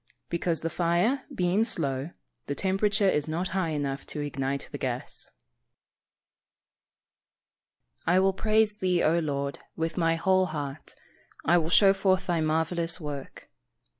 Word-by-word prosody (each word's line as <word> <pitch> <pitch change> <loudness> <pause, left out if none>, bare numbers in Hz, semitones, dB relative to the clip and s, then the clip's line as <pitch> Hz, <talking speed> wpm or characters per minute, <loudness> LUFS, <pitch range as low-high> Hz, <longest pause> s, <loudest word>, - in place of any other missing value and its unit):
_ - - -52 0.3
Because, 170 -1 -1
the 165 - -2
fire 180 - +1
being 180 +4 +1
slow, 140 - 0 0.4
the 140 - -2
temperature 195 +3 +1
is 150 -5 +2
not 170 +4 -2
high 185 -2 -1
enough 140 -3 -2
to - - -5
ignite 140 -1 -3
the - - -6
gas. - - -3
[Verse: - - -31 2.7
"I 180 +2 +5
will 195 0 +3
praise 215 +1 +2
thee, 180 -3 +1
O 165 +2 +3
Lord, 140 -3 -2 0.2
with 165 +2 -2
my 165 -1 +3
whole 185 +2 +2
heart; 145 -3 -6 0.5
I 175 +2 +5
will 160 -1 -2
show 195 +2 +6
forth 190 -1 +1
thy 170 -2 0
marvellous 165 +2 0
work." 145 -4 -7
170 Hz, 145 wpm, -27 LUFS, 150-190 Hz, 2.7 s, show